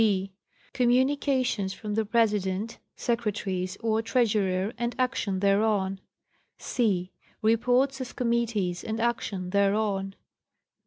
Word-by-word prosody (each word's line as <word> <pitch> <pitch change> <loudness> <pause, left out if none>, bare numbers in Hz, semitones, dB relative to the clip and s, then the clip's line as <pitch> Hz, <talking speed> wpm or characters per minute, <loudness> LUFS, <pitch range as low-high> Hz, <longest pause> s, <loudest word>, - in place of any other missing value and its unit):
6. 195 -3 +1 0.4
Communications 255 -4 +2
from 210 -2 -5
the 220 +1 +1
President, 210 -2 0 0.2
Secretaries 200 -5 -2
or 225 -1 +1
Treasurer 210 -4 +1
and 235 0 -2
action 245 -7 0
thereon. 200 -1 +2 0.6
c. 195 -7 0 0.3
Reports 250 +5 +2
of 255 - -6
committees 230 -7 0
and 220 +1 -3
action 205 -6 -1
thereon. 200 -1 +1
215 Hz, 100 wpm, -27 LUFS, 195-235 Hz, 0.6 s, Communications